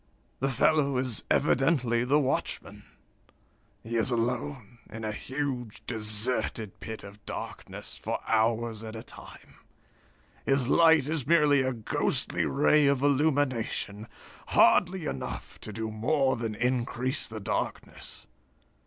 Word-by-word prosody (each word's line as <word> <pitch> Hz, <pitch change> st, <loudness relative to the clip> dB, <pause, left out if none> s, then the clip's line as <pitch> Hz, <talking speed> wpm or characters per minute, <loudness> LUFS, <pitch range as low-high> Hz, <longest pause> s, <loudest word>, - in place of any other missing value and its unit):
"The 135 Hz, -, 0 dB
fellow 140 Hz, +1 st, +2 dB
is 125 Hz, -3 st, 0 dB
evidently 125 Hz, -4 st, +2 dB
the 135 Hz, +4 st, +3 dB
watchman. 135 Hz, -3 st, -2 dB, 1.0 s
He 115 Hz, +1 st, -3 dB
is 115 Hz, -, +2 dB
alone, 120 Hz, 0 st, -2 dB
in 110 Hz, +1 st, -8 dB
a 110 Hz, -, -2 dB
huge, 130 Hz, -1 st, -4 dB
deserted 110 Hz, -1 st, -1 dB
pit 110 Hz, -1 st, -7 dB
of 100 Hz, +1 st, -12 dB
darkness, -, -, -6 dB
for -, -, -2 dB
hours 115 Hz, 0 st, +1 dB
at 110 Hz, 0 st, -7 dB
a 110 Hz, -, -7 dB
time. -, -, -13 dB, 0.9 s
His 135 Hz, -2 st, +2 dB
light 160 Hz, -2 st, +5 dB
is 150 Hz, -4 st, -2 dB
merely 150 Hz, -4 st, +5 dB
a 130 Hz, 0 st, 0 dB
ghostly 115 Hz, -4 st, -1 dB
ray 145 Hz, +1 st, +4 dB
of 140 Hz, -1 st, +2 dB
illumination, 130 Hz, -7 st, 0 dB, 0.4 s
hardly 180 Hz, -1 st, +4 dB
enough 70 Hz, -, -5 dB
to 110 Hz, -, -6 dB
do 110 Hz, +1 st, -4 dB
more 130 Hz, +4 st, +1 dB
than 115 Hz, -2 st, -4 dB
increase 125 Hz, +3 st, -1 dB
the 110 Hz, -1 st, -6 dB
darkness. 100 Hz, -, -4 dB
125 Hz, 125 wpm, -28 LUFS, 110-140 Hz, 1.0 s, light